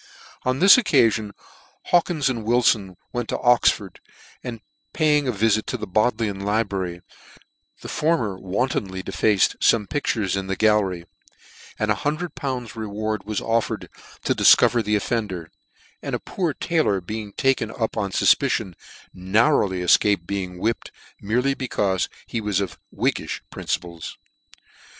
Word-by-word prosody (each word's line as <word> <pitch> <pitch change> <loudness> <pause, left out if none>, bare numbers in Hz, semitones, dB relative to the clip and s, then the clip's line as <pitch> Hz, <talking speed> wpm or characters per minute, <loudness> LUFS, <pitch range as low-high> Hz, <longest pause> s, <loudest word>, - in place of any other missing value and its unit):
On 130 0 +1
this 195 - +8
occafion 115 - +2 0.6
Hawkins 170 -5 +2
and 120 -4 -2
Wilfon 110 -5 +2 0.2
went 120 -2 -3
to - - -1
Oxford, 115 -6 +2 0.4
and 115 -2 -6 0.3
paying 150 -2 +2
a - - +2
vifit 110 0 +1
to 125 - -2
the 105 - -5
Bodleian 110 0 0
libra 105 -1 0
ry, 90 -1 -5 0.8
the - - -8
former 150 - 0
wantonly 95 -1 -2
defaced 105 -1 +1
fome 105 -3 +3
pictures 110 -10 -1
in 95 -1 -3
the 95 - -1
gallery; 100 -5 +2 0.7
and 105 0 0
lool. 145 -5 -3
reward 110 -1 -4
was 105 -1 -2
offered 115 0 -1 0.3
to - - +1
dif - - +7
cover 120 - +3
the 105 0 0
offender: 100 -6 -2 0.5
and - - -3
a - - -3
poor 170 -7 -3
taylor 155 - +1
being 105 +3 -6
taken 130 -4 +1
up 110 0 -3
on 100 -2 -1
fufpicion, 95 0 +2 0.4
narrowly 95 0 +2
efcaped 90 +1 +3
being 95 -1 -4
whipped, 115 +5 -2 0.3
merely 125 +7 +1
becaufe 105 -8 -1 0.2
he 115 - -4
was 105 -3 0
of 100 - -4
whiggifh - - -2
principles. 85 -2 -5
110 Hz, 135 wpm, -23 LUFS, 95-125 Hz, 0.8 s, this